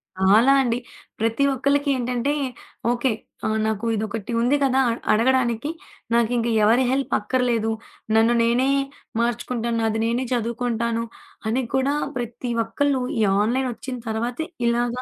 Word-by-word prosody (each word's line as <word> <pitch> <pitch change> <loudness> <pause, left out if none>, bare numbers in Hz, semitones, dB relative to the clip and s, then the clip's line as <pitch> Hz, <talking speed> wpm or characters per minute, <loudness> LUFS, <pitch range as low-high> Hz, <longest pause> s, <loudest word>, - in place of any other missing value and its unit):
చాలా 205 +7 +5
అండి. 235 -2 +1 0.4
ప్రతి 225 +5 +1
ఒక్కళ్ళకి 280 +2 +1
ఏంటంటే, 250 +3 -1 0.6
ఓకే. 245 +1 +1 0.4
ఆహ్, 220 0 0
నాకు 220 +1 -1
ఇదొకటి 220 +1 -4
ఉంది 250 +5 +3
కదా! 265 -1 +3
అ - - +2 0.2
అడగడానికి. 240 +3 +2 0.4
నాకు 235 0 +3
ఇంక 235 0 0 0.2
ఎవరి 235 +5 +4
హెల్ప్ 270 +1 -1
అక్కర్లేదు. 230 0 0 0.4
నన్ను 225 +2 +5
నేనే 245 +3 +2 0.5
మార్చుకుంటాను. 235 0 -1
నాది 220 0 0
నేనే 240 +3 0
చదువుకుంటాను 235 0 -1 0.5
అని 255 +3 +1
కూడా 265 +2 +2 0.2
ప్రతి 240 +1 -4
ఒక్కళ్ళు 270 +4 0 0.2
ఈ - - +2 0.2
ఆన్లైనొచ్చిన 250 +2 -1
తర్వాతే 240 +8 -2 0.2
ఇలాగా 240 +1 0
240 Hz, 130 wpm, -23 LUFS, 225-260 Hz, 0.6 s, చాలా